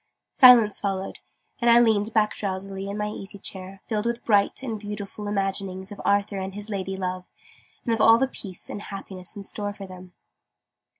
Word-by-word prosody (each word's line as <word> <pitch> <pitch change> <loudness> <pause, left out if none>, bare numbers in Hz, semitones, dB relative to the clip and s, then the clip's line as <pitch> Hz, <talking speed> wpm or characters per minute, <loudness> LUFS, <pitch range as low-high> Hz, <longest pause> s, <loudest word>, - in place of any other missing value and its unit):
Silence 240 -6 +7
followed: 195 -1 -3 0.4
and 240 -2 +3
I 235 0 +8
leaned 220 -2 +3
back 215 -2 +2
drowsily 195 0 -4
in 200 - -4
my 210 0 -1
easy 200 0 -7
chair, 190 0 -7
filled 215 0 -1
with 235 0 -3
bright 205 +3 +2
and 225 -5 -3
beautiful 205 0 -6
imaginings 195 -1 -2
of 205 - -8
Arthur 200 0 +1
and 190 0 -5
his 210 +1 -5
lady 195 -1 -3
love, 185 -1 -4 0.6
and 230 - +1
of 225 - 0
all 225 +1 +8
the 265 +3 +2
peace 195 -8 -9
and 205 - -6
happiness 195 -1 -8
in 200 - -7
store 205 +1 -3
for 200 -1 -9
them. 185 -1 -12
200 Hz, 185 wpm, -25 LUFS, 195-215 Hz, 0.6 s, I